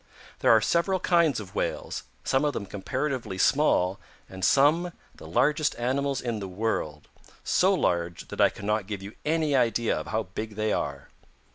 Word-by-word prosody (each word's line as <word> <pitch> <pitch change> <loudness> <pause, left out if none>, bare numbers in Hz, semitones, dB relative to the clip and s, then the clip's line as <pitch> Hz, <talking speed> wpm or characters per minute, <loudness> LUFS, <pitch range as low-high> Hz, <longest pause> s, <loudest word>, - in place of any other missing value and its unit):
There - - +2
are - - +7
several 185 +3 +1
kinds 170 -6 +3
of 100 -4 -9
Whales, - - -3 0.2
some 135 +2 +1
of 145 -1 +1
them 105 - -4
comparatively 130 +2 -3
small 95 -6 +2 0.3
and 95 0 -9
some 160 +5 +4 0.2
the - - -12
largest 150 +5 +2
animals 135 +3 -1
in 120 -3 -3
the 100 - -5
world, 90 -7 -3 0.4
so - - +3
large 85 -1 -1
that - - -2
I - - +6
cannot 105 0 -2
give 100 -2 -5
you 100 +2 -8
any 155 -2 +1
idea 115 -2 +2
of - - -5
how 110 +1 -1
big 105 +3 -6
they 110 0 0
are. 70 -1 -3
115 Hz, 170 wpm, -27 LUFS, 100-145 Hz, 0.4 s, are